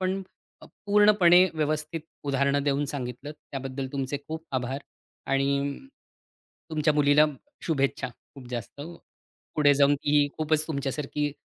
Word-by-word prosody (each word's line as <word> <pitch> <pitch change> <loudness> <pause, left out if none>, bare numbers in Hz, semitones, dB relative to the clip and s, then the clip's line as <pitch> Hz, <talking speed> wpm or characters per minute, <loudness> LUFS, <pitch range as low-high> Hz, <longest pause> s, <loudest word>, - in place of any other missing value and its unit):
पण 190 +1 -1 0.4
पूर्णपणे 205 -4 +5
व्यवस्थित 155 +1 -1 0.2
उदाहरणं 140 0 +1
देऊन 145 0 +1
सांगितल 125 0 -5
त्याबद्दल 135 -2 -6
तुमचे 140 0 -2
खूप 160 +1 -5
आभार, 130 +1 -1 0.5
आणि 140 +1 0 0.9
तुमच्या 155 -1 +2
मुलीला 150 +1 +5 0.4
शुभेच्छा 140 -4 0 0.3
खूप 135 -3 -11
जास्त. 120 +2 -6 0.7
पुढे 145 -2 +5
जाऊन 140 0 +4
ती 145 0 +2
खूपच 155 0 0
तुमच्यासारखी 145 0 -2
145 Hz, 110 wpm, -27 LUFS, 140-155 Hz, 0.9 s, पूर्णपणे